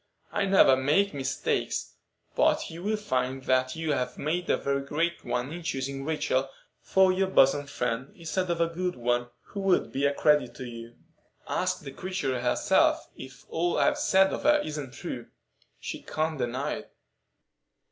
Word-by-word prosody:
"I 205 - 0
never 190 -8 +6
make 150 +10 +2
mistakes; 135 -2 -2 0.4
but - - +2
you 165 +1 -8
will 215 +3 0
find 130 -9 -2
that 130 0 +1
you 160 -1 -2
have 125 -2 -2
made 170 +4 -2
a - - +3
very 140 0 -1
great 165 +5 -1
one 125 +5 -2
in 175 - -6
choosing 135 -3 -3
Rachel 145 -4 0 0.3
for 190 -1 +4
your 190 +1 +1
bosom 145 -5 +4
friend 125 -1 -3
instead 180 +2 -2
of 170 - +1
some 170 +2 -1
one 120 0 0 0.2
who 200 - -6
would 195 -2 +2
be 140 +1 +1
a 140 - 0
credit 150 -6 +3
to 130 - -7
you. 115 -1 -9 0.5
Ask - - -1
the 135 - -7
creature 135 -6 -3
herself 125 0 +2
if 130 -1 -11
all 175 +2 0
I've 295 0 +2
said 190 -8 +4
of - - -3
her 300 +1 +4
isn't 150 -4 -5
true. - - -6 0.5
She - - -6
can't 155 -1 -2
deny 125 +3 -2
it." - - -12
145 Hz, 165 wpm, -28 LUFS, 130-175 Hz, 0.5 s, never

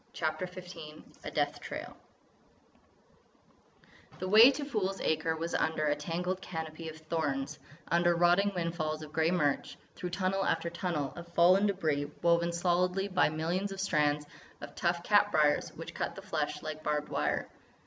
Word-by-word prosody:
CHAPTER 155 +2 -2
XIV 180 -4 -10 0.2
A - - -4
DEATH - - -1
TRAIL - - -7 2.2
The 185 - -4
way 220 +6 +9
to 285 +1 -2
Fool's 195 -8 -2
Acre 160 +1 0
was 165 +1 -4
under 155 -1 +1
a 145 -1 +2
tangled 175 +5 -3
canopy 160 -2 -6
of 160 - -9
thorns, 155 -4 -2 0.3
under 175 0 +3
rotting 175 +4 +4
windfalls 160 -3 -2
of 150 -1 -11
grey 160 +1 +2
mirch, 150 -6 0 0.2
through 180 - -4
tunnel 190 +2 0
after 165 -1 0
tunnel 170 -5 -2
of 175 0 -9
fallen 185 +4 +6
débris 155 -7 0
woven 170 0 +3
solidly 180 +3 +1
by 185 -4 +3
millions 170 +6 -2
of 195 - -6
strands 150 -6 +1 0.3
of - - -9
tough 170 -1 0
cat 205 +1 +4
briers 150 -3 +3
which - - -8
cut - - -3
the - - -8
flesh - - -2
like 155 0 -5
barbed 150 -1 -1
wire. 75 0 -1
170 Hz, 160 wpm, -31 LUFS, 155-185 Hz, 2.2 s, way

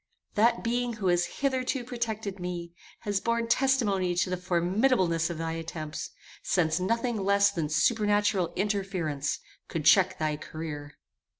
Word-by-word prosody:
That 230 +3 +3
being 240 +1 0
who 205 -4 -1
has 175 0 +3
hitherto 265 -1 -1
protected 220 -5 -4
me 175 -1 -5 0.3
has 205 -1 0
borne 230 0 0
testimony 230 -8 +2
to 175 +1 0
the - - +1
formidableness 180 -1 +1
of 170 - -4
thy 165 0 -2
attempts, 155 -2 -5 0.3
since 165 -2 +1
nothing 230 +2 0
less 200 0 +4
than 165 -6 -2
supernatural 205 +2 +2
interference 190 -8 -1 0.3
could 155 -3 -4
check 185 +4 +5
thy 155 -1 -1
career. 150 -2 -7
190 Hz, 135 wpm, -28 LUFS, 165-225 Hz, 0.3 s, check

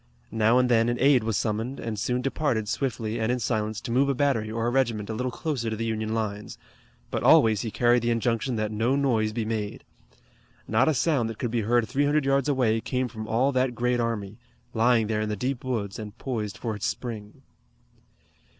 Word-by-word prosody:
Now 115 +2 +3
and 125 0 +4
then 115 -1 +3
an 120 - -1
aide 135 -3 +4
was 110 -2 0
summoned, 115 +4 -2
and 110 -3 -4
soon 125 +4 -1
departed 135 -6 -1
swiftly 115 -3 -2
and 110 +1 0
in 125 - +1
silence 110 -3 -1
to 120 - -5
move 135 +3 +3
a 140 - +1
battery 125 -5 +1
or 115 +1 -2
a 120 - +1
regiment 115 -5 0
a - - -3
little 125 +3 -2
closer 130 -6 -3
to 110 - -2
the 115 +1 -3
Union 110 0 -2
lines, 105 -2 -4 0.5
but - - -1
always 110 -3 +5
he 115 - -3
carried 120 +2 +3
the 120 - 0
injunction 115 +2 0
that 110 -1 -1
no 115 +5 +1
noise 120 -6 +1
be 110 0 -3
made. 110 -2 -3 0.8
Not 110 +4 +3
a 155 - +2
sound 135 -7 +1
that 115 - -7
could 120 - -3
be 120 -1 0
heard 115 +1 +2
three 140 +2 +1
hundred 150 0 +2
yards 135 +1 +2
away 120 -5 +2
came 125 +1 -2
from 110 -2 -7
all 125 +5 +2
that 130 -2 0
great 125 0 0
army, 110 -2 -3 0.3
lying 115 0 +3
there 105 0 -1
in 110 - -2
the 105 - -1
deep 125 +5 -3
woods 110 -6 -3
and 105 -2 -8
poised 110 -6 -4
for 115 -3 -3
its 105 - -2
spring. 110 -4 -6
115 Hz, 215 wpm, -26 LUFS, 110-125 Hz, 0.8 s, always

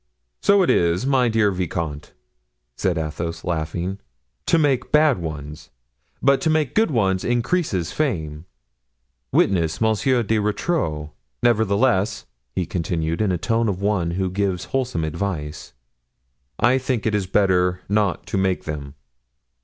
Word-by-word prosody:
"So 200 -1 +5
it - - +3
is, 85 +6 +2
my 130 -3 +3
dear 110 -2 +3
vicomte," 85 -5 -4 0.6
said 90 -3 0
Athos, 80 +1 -4
laughing, 85 +3 -3 0.5
"to - - +4
make 140 -5 +1
bad 150 -7 +4
ones; 75 -1 -7 0.5
but 140 0 +4
to 160 - +1
make 155 -3 +1
good 220 -2 +3
ones 95 -8 +1
increases 120 - 0
fame—witness 75 - -3
Monsieur 115 +3 +2
de 110 +1 +1
Rotrou. 105 - -1 0.3
Nevertheless," 110 -2 +2 0.3
he 90 - 0
continued, 85 0 -2
in 105 - +2
the 90 - +1
tone 115 +4 0
of 95 -2 -2
one 100 -4 0
who 95 -1 -1
gives 95 -2 -1
wholesome 130 -10 0
advice, 80 -2 -4 0.9
"I 125 +2 +4
think 130 -5 -2
it 110 - +1
is 100 -3 0
better 90 -2 +2
not 105 -2 0
to 95 - -2
make 95 -1 0
them." 70 -2 -6
95 Hz, 135 wpm, -22 LUFS, 80-120 Hz, 0.9 s, So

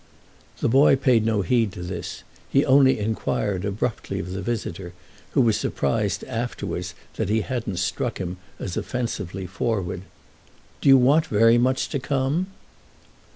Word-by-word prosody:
The - - +2
boy 135 +4 +6
paid 125 -5 +3
no 105 -3 +1
heed 115 +2 +2
to 90 - -7
this; 90 -1 -6 0.3
he 140 - +3
only 135 0 +5
enquired 105 -2 -1
abruptly 105 +3 -2
of 90 - -4
the 95 +1 -4
visitor, 95 -4 -4 0.4
who - - +4
was 115 -4 +3
surprised - - -1
afterwards 90 -6 -4 0.2
that 110 - -1
he 110 +1 +2
hadn't 115 -6 -3
struck 105 +5 -1
him 90 -1 -4 0.2
as 90 - -5
offensively 105 -7 -3
forward: 95 -1 -2 0.8
"Do - - +3
you 135 - +9
want 145 +6 +4
very 115 +1 +5
much 130 +2 +1
to 140 - -2
come?" 135 +6 0
115 Hz, 150 wpm, -24 LUFS, 95-130 Hz, 0.8 s, you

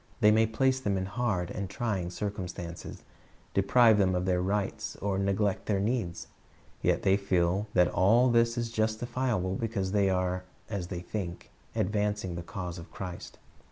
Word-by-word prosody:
They 105 -3 +6
may 110 +1 +4
place 130 +4 +2
them 100 -6 0
in 95 - -1
hard 95 -4 -1
and 100 -2 -4
trying 100 -4 -2
circumstances, 90 -3 -5 0.5
deprive 110 +2 +5
them 95 -2 +3
of 90 0 0
their 90 -1 +1
rights, 100 +2 -2
or 95 -1 -1
neglect 100 0 0
their 100 -2 +1
needs. 100 -6 -1 0.6
Yet - - +1
the}' 95 0 +4
feel 95 +1 +1
that 90 -1 +6
all 115 +9 +4
this 115 0 +3
is 115 -1 -2
justifiable 110 -2 0
because 100 -3 -2
they 100 -1 +3
are, 90 0 0 0.3
as 95 -5 -3
they 90 -1 -5
think, 90 -1 -5 0.2
advancing 105 -2 0
the 85 - -4
cause 90 0 -6
of 85 - -11
Christ. 90 -2 -7
100 Hz, 160 wpm, -29 LUFS, 90-110 Hz, 0.6 s, They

